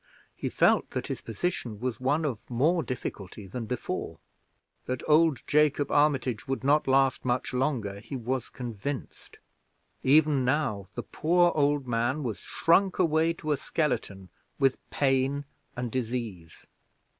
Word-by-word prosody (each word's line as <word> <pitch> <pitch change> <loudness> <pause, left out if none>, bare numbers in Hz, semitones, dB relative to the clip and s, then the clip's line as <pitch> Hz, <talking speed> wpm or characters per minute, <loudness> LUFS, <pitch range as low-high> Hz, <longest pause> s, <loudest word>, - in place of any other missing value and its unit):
He - - -3
felt - - +3
that - - -3
his - - -4
position 115 - -3
was 125 -2 -3
one 145 +5 +1
of 125 -7 -4
more 155 +8 +2
difficulty 105 -6 -6
than 115 +4 -6
before. 125 +1 -4 0.7
That 130 -1 -3
old 155 -3 +4
Jacob 145 -1 +2
Armitage 135 -6 +2
would 135 0 -2
not 145 +2 +3
last 135 0 +3
much 125 +1 -1
longer, 125 -7 -1
he 135 - -8
was 125 0 -3
convinced; 125 +2 -6 0.6
even 145 0 +4
now 125 -7 0
the - - -4
poor 175 +2 +2
old 145 -2 +2
man 120 +5 0
was 115 -5 -3
shrunk 185 +3 +2
away 165 -1 +3
to 155 -2 -4
a 145 - +2
skeleton 110 - -2 0.3
with 135 -2 +2
pain 135 +1 +1 0.3
and 125 -1 -3
disease. 115 -9 -4
130 Hz, 140 wpm, -28 LUFS, 120-150 Hz, 0.7 s, old